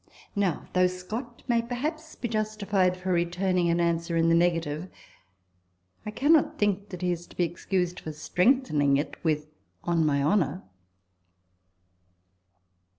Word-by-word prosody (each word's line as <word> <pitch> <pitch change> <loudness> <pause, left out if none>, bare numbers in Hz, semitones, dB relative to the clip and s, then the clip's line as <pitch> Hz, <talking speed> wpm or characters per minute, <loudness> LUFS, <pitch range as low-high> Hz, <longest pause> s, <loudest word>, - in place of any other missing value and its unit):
Now, 195 -6 0
though 185 0 +4
Scott 215 +7 -6
may 235 -2 +3
perhaps 305 +7 -4
be 240 - -3
justified 210 -4 0
for 185 0 -3
returning 175 +1 +1
an 170 +1 +2
answer 170 0 0
in 165 0 +3
the - - +4
negative, 165 -1 +1 1.2
I - - -1
cannot 290 +8 +3
think 205 -1 0
that 180 -2 -7
he 180 - +2
is 175 0 -4
to - - -18
be 180 - +3
excused 180 +1 -1
for 155 - -6
strengthening 155 - +2
it 145 - -4
with 155 -2 0 0.2
" - - -43
on 170 -2 +1
my 140 -2 +2
honour." 165 +1 +1
180 Hz, 145 wpm, -27 LUFS, 165-210 Hz, 1.2 s, though